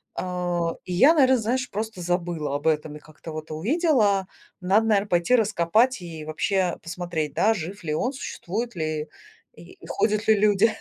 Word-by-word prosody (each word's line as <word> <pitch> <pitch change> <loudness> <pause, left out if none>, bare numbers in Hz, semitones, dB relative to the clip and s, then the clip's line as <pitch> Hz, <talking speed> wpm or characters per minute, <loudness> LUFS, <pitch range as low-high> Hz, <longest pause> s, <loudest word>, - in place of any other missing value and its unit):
А, 175 -2 -2
и 180 - -4
я, 270 - +6
наверно, 260 -3 +5
знаешь, 245 +3 -1
просто 215 -1 -4
забыла 170 -4 -2
об 145 +2 -2
этом 155 -1 0
и - - -13
как-то 155 +2 -12
вот 155 0 -7
увидела. 210 - +2 0.3
Надо, 195 +5 +3
наверно, 205 -2 +2
пойти 175 +8 +3
раскопать 215 +2 +2
и 165 -3 -8
вообще 180 +3 0
посмотреть, 165 -3 -4
да, 220 +2 +3
жив 190 +2 -6
ли 155 -2 -2
он, 245 - -1
существует 235 -3 -5
ли 155 -2 -3 0.5
и - - -15
ходят 215 0 0
ли 220 - +6
люди. 210 +1 +4
185 Hz, 165 wpm, -24 LUFS, 165-220 Hz, 0.5 s, я